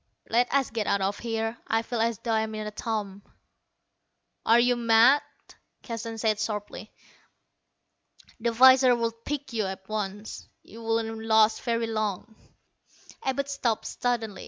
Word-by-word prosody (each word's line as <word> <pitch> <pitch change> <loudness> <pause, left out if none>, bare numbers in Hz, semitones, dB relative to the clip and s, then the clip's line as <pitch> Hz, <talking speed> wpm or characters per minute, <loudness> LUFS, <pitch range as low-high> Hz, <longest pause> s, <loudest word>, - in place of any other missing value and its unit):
"Let 240 +2 +2
us 275 -4 +1
get 220 -2 -2
out 200 - +1
of 195 +1 -1
here. 225 0 -3
I 225 +1 +1
feel 235 -1 -3
as 230 -1 0
though 230 - -4
I'm 220 0 0
in 215 0 -4
a 210 - -5
tomb." 210 -3 -4 1.3
"Are 230 +1 +6
you 245 +1 +3
mad?" 235 +4 +5 0.6
Keston 230 -1 -5
said 215 -1 0
sharply. 215 -1 -5 1.5
"The 235 +1 0
visors 260 +1 +6
would 230 0 -3
pick 290 -3 -4
you 220 -3 0
up 190 0 -6
at 190 - -32
once. 210 0 -5 0.2
You 230 - -13
wouldn't 225 0 -2
last 220 0 +4
very 230 -1 -1
long." 215 -1 -3 0.9
Abud 275 +1 -1
stopped 255 -5 -1
suddenly. 230 -4 -2
225 Hz, 150 wpm, -27 LUFS, 215-235 Hz, 1.5 s, Are